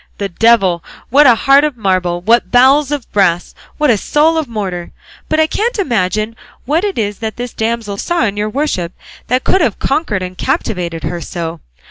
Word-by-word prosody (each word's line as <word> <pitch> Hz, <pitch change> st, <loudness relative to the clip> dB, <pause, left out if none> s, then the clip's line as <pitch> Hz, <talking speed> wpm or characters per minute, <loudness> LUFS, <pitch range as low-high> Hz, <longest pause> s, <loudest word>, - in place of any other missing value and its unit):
The 200 Hz, -1 st, -3 dB
devil! 195 Hz, -3 st, +3 dB, 0.3 s
What 285 Hz, +2 st, +6 dB
a 240 Hz, -, +7 dB
heart 275 Hz, +5 st, +4 dB
of 300 Hz, -4 st, -1 dB
marble, 185 Hz, -4 st, 0 dB
what 225 Hz, 0 st, +2 dB
bowels 265 Hz, +5 st, +4 dB
of 290 Hz, -4 st, -4 dB
brass, 175 Hz, -4 st, +1 dB, 0.2 s
what 300 Hz, -3 st, +3 dB
a 215 Hz, -, +1 dB
soul 310 Hz, +8 st, +2 dB
of 320 Hz, -3 st, -1 dB
mortar! 190 Hz, -6 st, -4 dB, 0.4 s
But 310 Hz, -, +1 dB
I 315 Hz, -, +5 dB
can't 460 Hz, +9 st, -1 dB
imagine 215 Hz, -, -1 dB, 0.3 s
what 310 Hz, +7 st, +1 dB
it 405 Hz, -2 st, -2 dB
is 205 Hz, -2 st, -2 dB
that 220 Hz, -1 st, -4 dB
this 245 Hz, 0 st, -5 dB
damsel 220 Hz, -2 st, -2 dB
saw 345 Hz, -, 0 dB
in 205 Hz, -2 st, -2 dB
your 210 Hz, +1 st, -2 dB
worship 210 Hz, -, -2 dB, 0.3 s
that 255 Hz, +1 st, +1 dB
could 380 Hz, -, +2 dB
have 235 Hz, -11 st, +1 dB
conquered 220 Hz, -, -1 dB
and 185 Hz, 0 st, -6 dB
captivated 175 Hz, -4 st, -2 dB
her 175 Hz, -1 st, -3 dB
so. 165 Hz, -1 st, -5 dB
225 Hz, 190 wpm, -15 LUFS, 185-280 Hz, 0.4 s, a